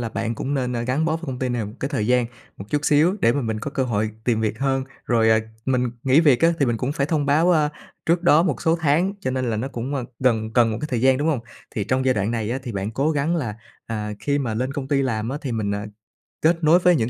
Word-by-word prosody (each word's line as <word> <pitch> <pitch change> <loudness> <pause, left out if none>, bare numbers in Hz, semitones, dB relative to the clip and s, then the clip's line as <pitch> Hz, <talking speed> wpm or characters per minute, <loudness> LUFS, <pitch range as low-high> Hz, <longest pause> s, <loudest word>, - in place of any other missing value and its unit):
là 115 - -2
bạn 115 +1 -3
cũng 140 +5 -3
nên, 125 -3 -1
a, 115 - -1
gắn 130 +6 0
bó 160 0 +1
với 165 - -12
công 130 -2 -4
ty 130 0 -1
này 120 -2 -1
một 105 - -7
cái 135 - -1
thời 110 -7 -1
gian 125 -1 +3 0.3
một 100 - -8
chút 145 0 0
xíu 155 +5 +4
để 115 - +4
mà 145 - -1
mình 110 -2 -2
có 140 - -4
cơ 135 - -1
hội 110 -2 -1
tìm 115 -3 +1
việc 110 0 -1
hơn. 135 -1 0 0.2
Rồi, 115 -2 +3
à, 110 - +5 0.3
mình 125 -2 +1
nghỉ 135 +4 +5
việc 145 -7 +4
á, 165 +1 +5
thì 140 - +3
mình 120 -1 +1
cũng 125 +5 -2
phải 140 -1 0
thông 150 -3 0
báo, 155 +5 +4
a, 150 -3 +3 0.4
trước 170 +1 +2
đó 165 -2 +5
một 155 -9 -1
số 165 +1 +3
tháng, 160 +6 +2
cho 130 - -2
nên 130 -2 -1
là 110 - -1
nó 125 +5 -2
cũng, 130 +2 -4
ơ, 130 - -2
gần 110 -4 +1
cần 115 -1 +4
một 110 - -3
cái 150 - -3
thời 120 -3 0
gian, 130 +1 +4
đúng 150 - 0
hông? 145 -7 +1 0.3
Thì 105 - -3
trong 130 +3 0
giai 130 -1 +3
đoạn 100 +1 0
này 115 -2 -2
á, 130 - -1
thì 120 -4 -6
bạn 100 +1 -3
cố 140 +7 0
gắng 155 +3 0
là, 120 -9 -2 0.3
à, 105 -2 -3
khi 145 0 0
mà 120 -6 -2
lên 130 +4 -2
công 140 -2 -5
ty 140 -1 +2
làm 115 -4 -1
á, 140 +3 -3
thì 130 - -4
mình, 110 -3 -1
à, 100 +1 -4 0.6
kết 165 +1 +2
nối 160 +3 +6
với 180 -1 +4
những 115 -4 0
130 Hz, 300 wpm, -23 LUFS, 115-145 Hz, 0.6 s, nối